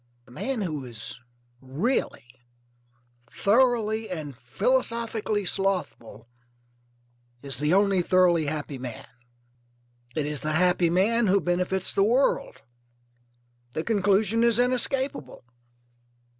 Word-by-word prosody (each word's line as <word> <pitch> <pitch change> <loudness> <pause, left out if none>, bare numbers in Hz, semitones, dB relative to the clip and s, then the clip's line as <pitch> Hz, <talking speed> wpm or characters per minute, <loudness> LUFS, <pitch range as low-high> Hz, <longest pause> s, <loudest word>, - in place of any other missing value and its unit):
The 125 - -19
man 250 - -3
who 155 -6 -4
is 115 -2 -8 0.4
really, 140 - -2 1.0
thoroughly, 225 - +1
and 155 -6 -6
philosophically 220 - -1
slothful 180 - -2 1.2
is 140 -1 -5
the 150 +5 +1
only 195 -2 +3
thoroughly 175 -3 +3
happy 145 -2 -4
man. 125 -3 -7 1.1
It 155 - -1
is 150 -1 -3
the 155 0 -2
happy 180 +1 +2
man 215 +6 +2
who 195 +1 +4
benefits 180 +1 0
the 195 - +3
world. 245 +6 +1 1.1
The 155 - -2
conclusion 210 +2 +2
is 235 -2 +3
inescapable. 250 - -1
185 Hz, 100 wpm, -26 LUFS, 150-225 Hz, 1.2 s, who